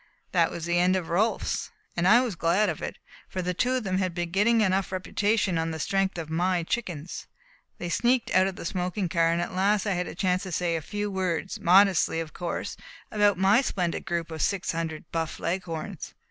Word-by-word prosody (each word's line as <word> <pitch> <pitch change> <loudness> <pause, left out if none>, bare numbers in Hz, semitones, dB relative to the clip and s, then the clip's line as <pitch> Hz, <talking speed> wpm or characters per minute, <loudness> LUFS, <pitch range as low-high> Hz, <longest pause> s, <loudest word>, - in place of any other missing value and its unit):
That 170 -3 +3
was 165 - -5
the 175 0 +1
end 180 +1 +4
of 180 -3 -2
Rolfs, 205 +7 0 0.3
and 175 +1 +1
I 235 +5 +7
was 245 -5 -2
glad 175 +5 +2
of 160 - -4
it, - - -5 0.3
for 185 - -3
the 180 +1 -1
two 250 +8 +1
of 255 -2 0
them 190 -2 0
had 185 -3 -1
been 175 -1 -3
getting 220 +5 +3
enough 190 -2 +1
reputation 195 0 0
on 165 0 -1
the 160 - -4
strength 195 +4 0
of 165 -2 -4
my 175 +2 +1
chickens. 175 -5 -4 0.5
They 175 - -4
sneaked 240 +8 +1
out 185 +1 +4
of 190 - -4
the - - -8
smoking 180 +2 -2
car, 165 -1 +3
and 170 - +1
at 175 - -3
last 200 +2 +2
I 200 - +1
had 180 -1 -2
a - - -7
chance 185 0 +1
to 190 - -6
say 170 0 0
a 165 - -2
few 205 +5 -3
words, 185 -1 -2
modestly 185 -2 +4
of 160 -2 -5
course, 175 -1 -4 0.3
about 205 -2 +3
my 195 +6 +5
splendid 180 -10 -2
group 170 -1 -2
of 160 -1 -5
six 195 -2 0
hundred 160 -2 -4
Buff 165 -1 -2
Leghorns. 170 -3 -4
180 Hz, 215 wpm, -27 LUFS, 170-195 Hz, 0.5 s, I